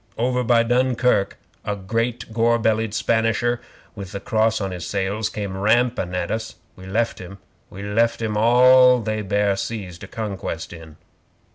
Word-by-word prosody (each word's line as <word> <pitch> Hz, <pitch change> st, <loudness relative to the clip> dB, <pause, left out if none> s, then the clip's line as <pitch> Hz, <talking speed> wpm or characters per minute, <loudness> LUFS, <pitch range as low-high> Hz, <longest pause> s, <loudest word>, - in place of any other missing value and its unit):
Over 125 Hz, +2 st, 0 dB
by 115 Hz, -1 st, +3 dB
Dunkirk 125 Hz, -3 st, +1 dB, 0.3 s
a 105 Hz, -, -2 dB
great 115 Hz, +4 st, -3 dB
gor 115 Hz, +1 st, +3 dB
bellied 110 Hz, -1 st, 0 dB
Spanisher, 115 Hz, +1 st, +1 dB, 0.3 s
with 100 Hz, -2 st, -9 dB
the 100 Hz, -, -4 dB
Cross 110 Hz, +2 st, +1 dB
on 95 Hz, -2 st, -3 dB
his 90 Hz, -1 st, -6 dB
sails, 100 Hz, +3 st, -2 dB
came 100 Hz, -3 st, -5 dB
rampin' 110 Hz, -2 st, +1 dB
at 90 Hz, -1 st, -2 dB
us. 110 Hz, 0 st, -4 dB, 0.2 s
We 95 Hz, 0 st, -12 dB
left 115 Hz, +5 st, -1 dB
him. 95 Hz, +2 st, -9 dB, 0.3 s
We 100 Hz, +2 st, -9 dB
left 115 Hz, +3 st, +1 dB
him 110 Hz, -2 st, -2 dB
all 125 Hz, +3 st, +6 dB
they 110 Hz, -1 st, -2 dB
bare 100 Hz, 0 st, +1 dB
seas 95 Hz, -4 st, -5 dB
to -, -, -9 dB
conquest 100 Hz, -7 st, -5 dB
in. 80 Hz, -2 st, -12 dB
110 Hz, 160 wpm, -22 LUFS, 100-115 Hz, 0.3 s, all